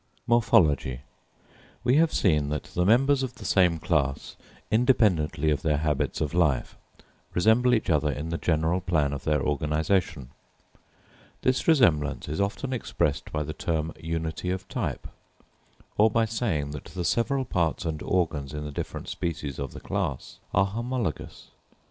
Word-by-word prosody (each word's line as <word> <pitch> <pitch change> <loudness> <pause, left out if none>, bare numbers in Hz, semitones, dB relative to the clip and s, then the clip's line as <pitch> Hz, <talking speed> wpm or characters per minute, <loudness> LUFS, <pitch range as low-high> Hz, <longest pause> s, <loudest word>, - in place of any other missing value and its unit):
Morphology. 80 - +3 0.8
We 125 +3 +3
have 165 0 +4
seen 75 -6 +2
that 75 +1 -2
the 90 - +1
members 135 +5 +4
of 130 -2 -4
the - - -11
same 90 -4 +3
class, 70 -3 -1 0.4
independently 100 - +3
of 70 -3 0
their 75 -2 +1
habits 75 -1 -1
of 75 0 -1
life, 80 -8 +1 0.6
resemble 110 +7 +4
each 110 - -2
other 75 -3 +2
in 75 +3 -5
the 85 - -3
general 80 +2 +1
plan 80 -6 +1
of 70 - -6
their 75 -3 +1
organisation. 75 -1 0 1.1
This 130 0 +1
resemblance 75 - +3
is 75 +5 -2
often 115 +7 -2
expressed 75 - -1
by 75 0 -1
the 75 +1 -5
term 80 0 -2
"unity 80 +1 -3
of 95 +1 -3
type;" - - -3 0.9
or 110 +2 +6
by 115 +1 +2
saying 105 - -2
that 75 - -7
the 90 -2 -5
several 130 +6 +1
parts 85 -4 -1
and 80 -2 -3
organs 75 -6 -1
in 75 0 -4
the 75 - -5
different - - -5
species 75 -5 -4
of 70 -2 -4
the - - -9
class 65 -3 -4
are 100 - +3
homologous. 115 -2 -4
80 Hz, 155 wpm, -26 LUFS, 75-110 Hz, 1.1 s, or